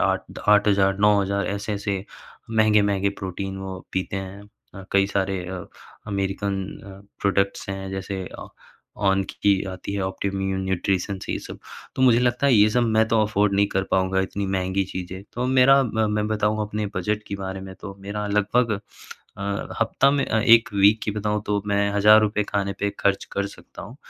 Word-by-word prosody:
8-8, 100 -2 +2
9 100 -1 +2
ऐसे-ऐसे 100 -1 -3 0.5
महँगे-महँगे 105 -3 +3
प्रोटीन 95 +1 -4
वो 95 -1 -6
पीते 95 +1 -2
हैं। 95 +1 -7 0.3
अ, 95 -1 -9
कई 100 0 +4
सारे 95 -1 0
अ, 90 0 -6 0.4
अमेरिकन 100 0 -2 0.3
अ, 100 -1 -11 0.2
प्रोडक्ट्स 100 -1 0
हैं, 95 0 -5
जैसे 95 0 -4 0.2
अ, - - -8 0.5
ऑन 95 -1 +2
की 100 -2 +1
आती 95 +1 -6
हैं 100 - -2
ऑप्टिमम 95 +1 -3 0.2
न्यूट्रिशन 95 +1 -1
ये - - -1
सब - - -9 0.4
तो 130 - +1
मुझे 120 -3 +6
लगता 125 +2 +1
है 135 - +5
ये 105 -1 +6
सब 125 +3 +2
मैं 110 0 +4
तो 115 -1 +3
अफ़ोर्ड 105 -1 +1
नहीं 100 +1 +3
कर 95 - 0
पाऊँगा 95 0 +2
इतनी 100 +1 -3
महँगी 95 0 0
चीज़ें 95 +1 -6
तो 125 +1 -2
मेरा, 130 +1 +5
मैं 105 -2 0
बताऊँ 110 0 0
अपने 105 0 -3
बजट 105 +4 -1
के 100 - -3
बारे 95 0 -5
में 95 0 -9
तो 100 - -7
मेरा 105 +1 -4
लगभग 105 +3 +2 0.7
अ, - - -5 0.4
हफ़्ता 125 +4 +3
में 140 0 +1
1 115 +1 +5
वीक 100 +2 +5
की - - -1
बताऊँ 105 0 -2
तो 105 -1 0
मैं 100 0 +1
हज़ार 105 +1 +7
रुपए 105 0 +1
खाने 100 -1 -1
पे 100 - +1
ख़र्च 100 0 +1
कर 100 0 -1
सकता 100 - -12
हूँ। 110 +7 -10
100 Hz, 175 wpm, -23 LUFS, 95-105 Hz, 0.7 s, हज़ार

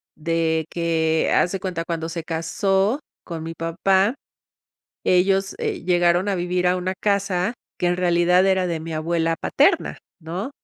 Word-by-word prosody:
de 160 0 0
que 160 -2 +1
haz 175 - +3
de 195 - -3
cuenta 175 -3 -3
cuando 165 -1 -3
se 165 -1 -5
casó 190 - 0 0.2
con 165 -2 -6
mi 165 0 -5
papá, 190 - +1 0.9
ellos, 190 +1 +2
eh, - - -3
llegaron 175 +1 +2
a 200 - +1
vivir 180 0 -1
a 180 +1 +3
una 185 +1 -2
casa 200 0 0 0.3
que 180 - 0
en 175 0 +1
realidad, 180 +1 +3
era 190 -1 +2
de 165 -1 -2
mi 165 0 -6
abuela 165 +1 0
paterna, - - +1 0.2
¿no? 175 - -5
175 Hz, 160 wpm, -22 LUFS, 165-190 Hz, 0.9 s, haz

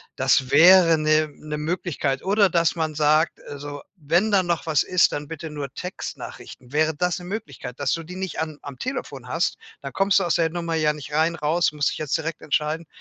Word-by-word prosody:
Das 130 -1 +2
wäre 165 +2 +7
'ne 155 0 +2
'ne 150 0 -6
Möglichkeit, 150 -4 -2
oder 200 0 +3
dass 170 -1 +2
man 160 -2 -2
sagt: 155 +2 +2
„Also, 145 0 -7
wenn 175 +7 +1
da 195 -2 +4
noch 170 -2 -1
was 155 -3 +2
ist, 180 -1 +3
dann 145 0 -4
bitte 160 0 -7
nur 140 -3 -5
Textnachrichten.“ 145 -7 -8
Wäre 155 0 +2
das 180 +3 -1
'ne 175 - -10
Möglichkeit, 150 - -7
dass 140 - 0
du 165 - -2
die 180 +3 -9
nicht 190 -2 -4
an 155 -2 -4
am 140 -2 -9
Telefon 255 +2 -5
hast, - - -1 0.2
dann - - -7
kommst 195 0 +3
du - - -1
aus 170 - +1
der 165 -1 +2
Nummer 170 0 -4
ja 155 -1 +2
nicht 150 -1 -9
rein, 160 +2 +2
raus, 160 +2 +1
musst 145 -1 +1
dich - - -6
jetzt 155 +2 0
direkt 160 0 -5
entscheiden. 155 +2 -1
160 Hz, 210 wpm, -23 LUFS, 150-175 Hz, 0.2 s, wäre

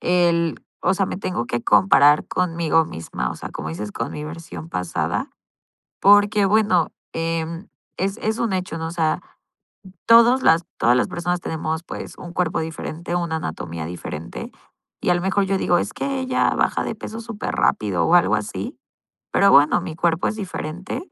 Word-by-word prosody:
El 170 -2 +2 0.2
o 185 - +3
sea, 195 - +1
me 185 - -4
tengo 180 -10 -2
que 120 0 -3
comparar 145 -6 +5
conmigo 165 -2 +1
misma, 65 -6 -4
o - - -5
sea, - - -8
como 80 - -6
dices 105 +6 -5
con 115 - -3
mi 150 - -6
versión 165 +1 -8
pasada. 90 - -2 0.7
Porque, 205 +1 +5
bueno, 200 -4 +3 0.2
em, 165 +1 -3 0.3
es 195 +3 -1
es 220 +1 -2
un 230 -4 0
hecho, 185 -3 -3
¿no?, 160 0 -3
o - - -5
sea, 165 -2 0 0.9
todos 235 +3 +7
las 165 -6 +4
todas 120 +2 +4
las - - +1
personas 175 0 -2
tenemos, 160 0 -3
pues - - -8
un 175 -1 -9
cuerpo 180 -2 0
diferente, 160 +1 -5
una 170 -2 -1
anatomía 85 - -5
diferente. 85 -2 -7 0.5
Y - - -1
a - - +6
lo 175 - -1
mejor 190 +2 +1
yo 195 0 0
digo: 175 - +3
"Es - - -2
que 275 -1 -2
ella 260 0 +1
baja - - +1
de - - -3
peso 220 +1 -7
superrápido" 230 -2 0
o - - +5
algo - - +4
así, - - -4 0.6
pero 200 0 +5
bueno, 145 +2 +6
mi 155 - -6
cuerpo 170 0 +1
es - - -2
diferente 185 - -5
170 Hz, 175 wpm, -22 LUFS, 155-195 Hz, 0.9 s, todos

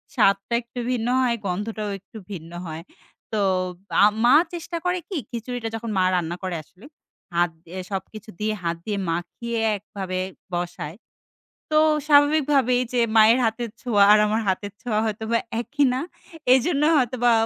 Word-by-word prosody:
স্বাদটা 200 0 +2
একটু 240 +1 -9
ভিন্ন 240 -2 -1
হয় 240 -2 +2
গন্ধটাও 210 +3 -3
একটু 210 +3 -14
ভিন্ন 165 -3 -7 0.2
হয়। 160 +1 -6 0.5
তো 215 - 0 0.6
আ - - +9 0.2
মা 245 +4 +7 0.2
চেষ্টা 340 0 -4
করে 360 0 +1
কি 370 - -3
খিচুড়িটা 235 0 -4
যখন 225 0 -5
মা 185 - +4
রান্না 170 -1 -1
করে 185 -2 -2
আসলে, 185 - -19 0.5
হাত 175 0 +3 0.2
দিয়ে 185 +3 -7
সবকিছু 210 +3 -6
দিয়ে 215 0 0
হাত 170 0 -1
দিয়ে 210 -2 -2
মাখিয়ে 225 +8 -3 0.2
একভাবে 190 -2 -5 0.3
বসায়। 175 -2 -4 0.8
তো - - +5 0.3
স্বাভাবিকভাবে 290 -3 +4 0.2
যে 245 - +2 0.2
মায়ের 220 +3 +7
হাতের 225 +1 -1
ছোঁয়া 210 -5 +3
আর 210 - +7
আমার 215 +2 +1
হাতের 195 +1 -1
ছোঁয়া 215 -3 0
হয়তোবা 220 +2 -1 0.2
একই 290 +4 0
না। 255 - -1 0.5
এজন্য 280 +3 +2 0.2
হয়তোবা 245 -2 +2
220 Hz, 150 wpm, -24 LUFS, 190-245 Hz, 0.8 s, আ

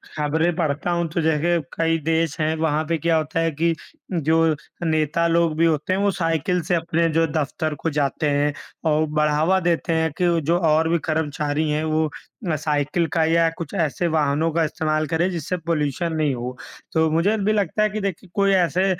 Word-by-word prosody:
खबरें 160 +3 0
पढ़ता 160 0 -1
हूँ 170 -1 0
तो 170 +1 -1
देखिए 160 +2 +2
कई 165 0 +1
देश 165 -1 0
हैं, 155 +1 +1
वहाँ 155 -1 0
पे 165 - +1
क्या 165 +2 +1
होता 155 +1 -2
है 165 0 +1
कि 165 +3 +1 0.4
जो 160 0 +2 0.3
नेता 155 +1 +1
लोग 165 -1 +2
भी 165 - +4
होते 160 +2 +1
हैं 190 - 0
वो 200 0 +2
साइकिल 165 +1 0
से 175 +2 0
अपने 165 0 +1
जो 165 0 +3
दफ़्तर 155 +1 -2
को 165 +4 -2
जाते 145 +1 0
हैं, 145 +1 +1 0.3
और 155 0 +3
बढ़ावा 150 +4 +2
देते 170 -1 0
हैं 160 -1 +1
कि 170 -2 +3
जो 170 +3 +3
और 160 +1 +3
भी 170 - +2
कर्मचारी 155 -1 -1
हैं 150 +1 0
वो 155 0 +1 0.5
अ, 155 - +1
साइकिल 150 +2 0
का 165 -2 +3
या 165 0 +3
कुछ 165 -4 -6
ऐसे 165 +2 0
वाहनों 155 0 +1
का 165 +1 +1
इस्तेमाल 155 0 -1
करें 170 +3 +1
जिससे 175 +1 -3
पॉल्यूशन 160 0 -1
नहीं 155 -3 +1
हो। 125 +1 -5 0.4
तो 160 -1 +3
मुझे 180 +7 +2
भी 210 +1 +1
लगता 210 0 +1
है 215 - +2
कि 215 +1 -4
देखिए 190 -1 -4
कोई 200 -1 +3
ऐसे 180 0 +2
160 Hz, 200 wpm, -22 LUFS, 155-170 Hz, 0.5 s, भी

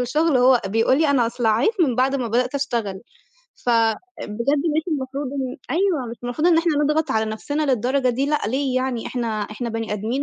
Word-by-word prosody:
الشُغل 290 +3 +2
وهو 250 -1 +5
بيقول 225 +7 +2
لي 310 -3 +3
أنا 250 -4 +3
أصلعّيت 230 - +1
من 270 -7 +3
بعد 260 +3 +2
ما 250 -4 -1
بدأت 250 +4 0
أشتغل. 235 -9 -2 0.6
فبجد 230 -2 +3 0.8
مش 320 - +2
المفروض 275 -1 -3
إن 265 0 -3
أيوه 335 -7 +1
مش 235 - -7
المفروض 245 +7 -1
إن 330 -2 +5
إحنا 335 -1 +2
نضغط 300 0 +1
على 220 -2 +1
نَفْسنا 285 +8 -3
للدرجة 255 0 +1
دي 260 +3 0
لأ، 300 0 +1
ليه 260 +2 -1
يعني؟ 255 -3 -1
إحنا 245 -2 -3 0.2
إحنا 215 +4 -5
بني 225 -1 -3
آدمين 225 +7 -2
255 Hz, 190 wpm, -22 LUFS, 230-285 Hz, 0.8 s, وهو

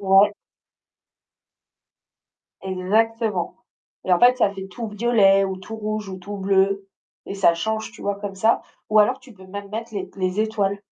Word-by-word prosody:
Ouais. 195 +1 +5 2.3
Exactement 205 +1 0 0.5
et 185 - +2
en 175 - +5
fait, 245 +1 +6
ça 205 -5 +2
fait 195 -1 -7
tout 225 +4 -6
violet 210 -3 +4
ou 190 -1 -3
tout 190 +4 -8
rouge 215 -2 -4
ou 190 - -6
tout 205 +3 -7
bleu 195 0 +1 0.4
et - - -6
ça 195 -4 +4
change, 220 +6 -2
tu - - -13
vois, 200 0 -1
comme 200 -1 -5
ça, 220 +4 +2 0.3
ou 215 - +5
alors, 210 - +4
tu 250 - -16
peux 190 -2 -15
même 200 +1 -8
mettre 225 +1 -6
les 190 -2 -4
les 185 +2 -1
étoiles 205 -2 0
200 Hz, 170 wpm, -23 LUFS, 190-220 Hz, 2.3 s, fait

